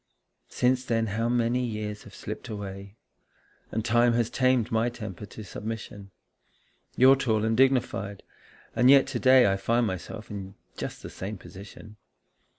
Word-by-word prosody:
Since 125 +1 +1
then 115 -2 0
how 115 +2 0
many 120 +1 +1
years 105 -3 -4
have 100 - -13
slipped 110 +4 -7
away? 100 -1 -7 0.8
And 110 0 -2
time 120 +1 +4
has 115 -1 0
tamed 130 -3 +2
my 115 +1 +2
temper 105 -4 -8
to 110 - -10
submission. 105 -1 -7 0.9
You're 130 +2 +7
tall 110 -5 0
and 110 0 +1
dignified, 120 -6 +1 0.5
and 125 +2 +5
yet 135 -1 +7
to 135 -3 -4
day 130 -1 +6
I - - -1
find 115 +4 +1
myself 105 +3 -6
in 100 -1 -7 0.2
just - - -6
the - - -7
same 100 +3 -6
position. 100 +3 -12
115 Hz, 155 wpm, -27 LUFS, 105-120 Hz, 0.9 s, You're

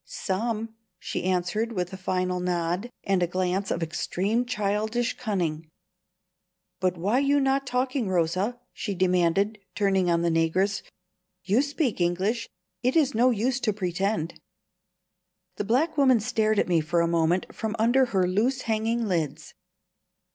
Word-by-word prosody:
"Some," 225 +3 -3 0.2
she - - -4
answered, 185 +5 0
with 180 -2 -3
a - - -3
final 185 -1 -1
nod 180 +4 -1
and 195 -2 +1
a 175 - +2
glance 185 +2 -1
of 170 - -1
extreme 200 +8 -1
childish 215 +1 -1
cunning. 170 -8 -2 1.1
"But 185 -1 0
why 205 +9 +1
you 285 +1 +3
not 270 0 +1
talking, 255 -2 0
Rosa?" 185 +7 0
she 200 -4 -4
demanded, 185 +3 +2 0.2
turning 195 -3 +2
on 170 0 +2
the 170 - +2
negress. 185 +5 +1 0.6
"You 200 +7 +3
speak 285 - -1
English; 195 +7 0 0.3
it 255 +2 +1
is 290 -4 +3
no 245 +3 +4
use 245 +3 0
to 215 -4 0
pretend." 190 -2 -2 1.2
The 205 - -2
black 260 +10 +1
woman 260 -4 +5
stared 215 0 +1
at - - +2
me 170 -3 +3
for 170 +2 +1
a 170 - +2
moment 170 +2 +1
from 220 0 -3
under 240 +4 +4
her 190 -6 +1
loose 235 +8 +1
hanging 225 +1 0
lids. 165 -6 -2
200 Hz, 145 wpm, -26 LUFS, 180-235 Hz, 1.2 s, woman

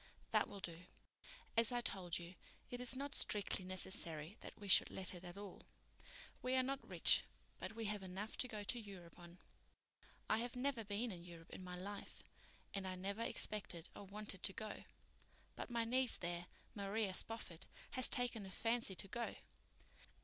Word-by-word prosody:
"That - - +4
will 200 - -7
do. 170 0 -3 0.7
As 230 +1 +5
I 245 - +2
told 185 -7 -2
you, 170 +1 -7 0.4
it 245 0 -3
is 250 +1 +4
not 280 +2 -3
strictly 200 -2 +4
necessary 180 -2 -1
that - - -9
we 205 - -8
should 190 - +8
let 190 0 +2
it 180 0 -8
at 175 +1 -7
all. 200 -2 -7 0.8
We 255 +1 +1
are 260 - +5
not 275 +1 -2
rich, - - +5 0.4
but 225 - -5
we 225 -1 -3
have 210 -1 -1
enough 190 +3 -4
to 255 - +1
go 215 -3 -4
to 240 +4 +1
Europe 190 -6 -9
on. 175 0 -11 0.9
I 220 - +3
have 240 +1 -2
never 250 -2 0
been 210 +3 -1
in 175 -3 -7
Europe 170 -1 -11
in - - -7
my 180 0 -5
life, 200 +3 -6 0.5
and 190 -2 -2
never 200 +4 -2
expected 195 -7 +4
or 200 - -7
wanted 200 -1 -3
to 195 - +2
go. 215 +1 -5 0.7
But - - -5
my 235 -1 +1
niece 255 +1 +4
there, 175 0 -3 0.3
Maria 200 0 0
Spofford, 185 -5 +3 0.2
has 255 -2 +2
taken 245 -3 +1
a - - -7
fancy 225 0 +1
to 195 - -1
go. 235 +4 -2
205 Hz, 180 wpm, -41 LUFS, 185-230 Hz, 0.9 s, should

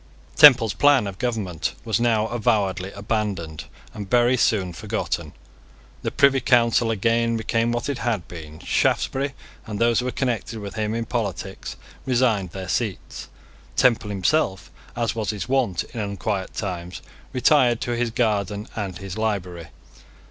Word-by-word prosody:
Temple's 130 -8 +8
plan 145 -5 +4
of 100 -1 -6
government 110 -9 -2
was 115 0 +1
now 115 -2 +2
avowedly 100 -5 0
abandoned 100 -7 -3 0.3
and 105 -3 -7
very 120 +2 +4
soon 100 -6 +1
forgotten. 80 - -3 0.7
The - - -1
Privy 140 -1 +4
Council 120 -2 +3
again 115 +2 +1
became 115 +1 0
what 120 0 -2
it 140 -4 -3
had 110 -7 -1
been. 80 -3 -9
Shaftesbury, 135 +1 0 0.3
and 105 -2 -4
those 115 +1 +3
who 125 - -2
were 125 - -1
connected 120 -3 -2
with 100 -2 -7
him 110 0 -2
in 115 0 -2
politics 105 - -4 0.3
resigned 120 -7 +1
their 95 +2 -7
seats. 90 - -3 0.5
Temple 115 -4 +3
himself, 100 0 0 0.2
as 115 -3 -1
was 110 -3 -3
his 105 -1 -3
wont 125 -10 +1
in 120 - -5
unquiet 100 -1 -3
times, 90 -3 -5 0.3
retired 125 -2 +3
to 120 - -2
his 120 0 0
garden 105 -3 -1
and 95 -5 -4
his 95 +2 -7
library. 90 -6 -2
110 Hz, 150 wpm, -23 LUFS, 95-120 Hz, 0.7 s, Temple's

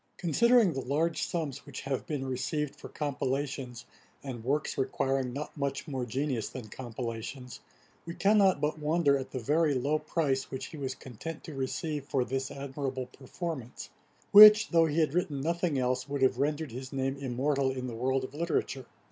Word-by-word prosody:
] - - -43
Considering 220 - +4
the 135 - -3
large 155 +6 0
sums 150 -6 -3
which 140 - -7
have 135 -2 -3
been 145 -3 -3
received 135 +3 -2
for - - -10
compilations, 135 -3 -3 0.4
and 125 -5 -6
works 140 +4 0
requiring 135 -1 0
not 145 +4 -6
much 140 -2 -3
more 130 -4 -3
genius 130 -2 -2
than 125 -4 -8
compilations, 120 +1 -6 0.5
we 170 - -5
cannot 200 -2 +4
but 150 +1 -1
wonder 150 -1 +3
at 135 -1 -3
the - - -5
very 150 +4 +2
low 145 +4 +1
price 140 -6 -1
which 130 - -5
he 160 - -9
was 135 -2 -3
content 140 +6 -8
to 160 - -8
receive 145 +2 -3
for 135 -2 0
this 135 +1 -2
admirable 135 -1 -4
performance; 135 -2 -6 0.4
which, 210 +1 +10
though 165 -2 +4
he 155 +1 0
had 150 -2 +1
written 160 -5 0
nothing 170 +1 0
else, 125 +2 0
would 140 -1 -1
have 130 -1 +3
rendered 150 0 -1
his 130 +2 -7
name 135 0 -1
immortal 135 +1 0
in 130 -1 -4
the 125 - -5
world 130 +3 0
of 130 - -7
literature. 150 -5 -2
140 Hz, 180 wpm, -30 LUFS, 130-155 Hz, 0.5 s, which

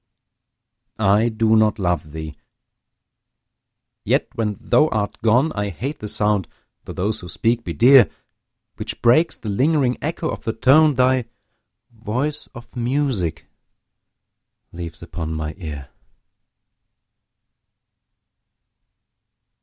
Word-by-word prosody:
I 110 +2 +3
do 110 0 +2
not 110 0 +3
love 90 -6 -1
thee! 80 -1 -7 1.7
yet - - +1
when 105 -3 -2
thou 155 - +3
art 105 -7 -3
gone 125 +8 +3
I 105 -1 -2
hate 135 - -5
the 105 - -6
sound 105 -2 0 0.4
(though - - -7
those 100 +4 -2
who 90 - -10
speak 115 +6 0
be - - -5
dear) 125 -5 +6 0.7
Which - - -5
breaks 155 +8 +4
the 110 - -7
lingering 130 +3 +1
echo 160 +2 -3
of - - -6
the 115 - -2
tone 145 +6 +4
Thy 130 -1 +2 0.7
voice 120 +7 -3
of 120 +2 -13
music 120 - -1 1.3
leaves 85 -1 -8
upon 80 -1 -5
my 80 0 -4
ear. 75 -5 -7
110 Hz, 110 wpm, -21 LUFS, 90-130 Hz, 1.7 s, dear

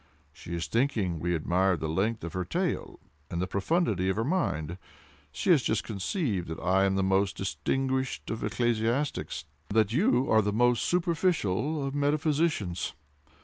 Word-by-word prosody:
She 85 +2 -7
is 85 - -2
thinking 115 - 0
we 85 +2 0
admire 90 +3 +2
the 80 - -3
length 100 +7 0
of 85 - -5
her 95 - -1
tail 85 - -2 0.3
and 85 - -3
the 90 - +1
profundity 100 - 0
of 95 - +1
her 110 - 0
mind. 90 - -1 0.5
She 80 - +1
has 155 -6 +6
just 110 -3 0
concluded 105 - -2
that 80 0 -5
I 95 +2 +3
am 95 0 +1
the 95 - +1
most 95 +1 +1
distinguished 130 +6 -1
of 110 - -4
ecclesiastics, 120 +5 -1 0.2
and 105 - -1
that 110 0 +3
you 155 - +3
are 110 - +5
the 105 0 0
most 120 +2 +2
superficial 160 - +1
of 135 - -3
metaphysicians. 145 - 0
110 Hz, 165 wpm, -28 LUFS, 90-135 Hz, 0.5 s, has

